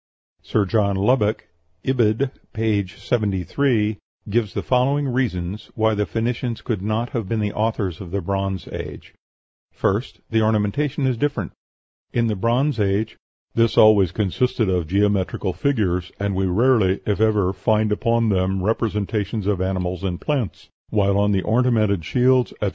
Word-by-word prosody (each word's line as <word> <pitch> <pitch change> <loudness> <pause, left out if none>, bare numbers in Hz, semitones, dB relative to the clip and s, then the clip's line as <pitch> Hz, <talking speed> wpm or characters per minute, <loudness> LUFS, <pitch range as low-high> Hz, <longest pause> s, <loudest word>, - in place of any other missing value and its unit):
Sir 105 -2 0
John 100 0 +1
Lubbock 105 +1 +1 0.4
(Ibid., 125 0 +2 0.2
p. 110 -3 0
73) 105 +2 0 0.3
gives 110 -3 0
the - - -2
following 135 +3 +2
reasons 105 -6 -2
why 110 0 +2
the 105 -1 -1
Phoenicians 115 +1 -2
could 110 -6 -2
not 110 +4 -2
have 115 -6 -3
been 115 - 0
the 105 -1 -1
authors 105 -6 -1
of 90 - -8
the 100 +3 -2
Bronze 95 -1 -2
Age: - - -8 0.6
First, 100 +6 -2
the 110 -1 +3
ornamentation 110 +7 +1
is 130 -3 +1
different. 125 - -1 0.6
In 120 -1 +2
the 110 -2 0
Bronze 120 +6 +1
Age 105 +2 0 0.4
"this 115 -1 +2
always 105 -5 +6
consists 110 +7 -1
of 90 -7 +1
geometrical 100 0 0
figures, 90 -5 0
and 100 0 -1
we 95 0 0
rarely, 105 -1 +3
if 105 -1 0
ever, 105 -4 +2
find 105 +3 +1
upon 115 +2 +1
them 95 -1 0
representations 105 -1 -1
of 100 -3 0
animals 95 -1 -2
and 90 -2 -2
plants, 130 - -3 0.2
while 100 -2 +2
on 105 0 +2
the 95 -2 +1
ornamented 110 -5 +2
shields, 125 +6 +2
etc. 105 - -2
105 Hz, 150 wpm, -22 LUFS, 95-115 Hz, 0.6 s, always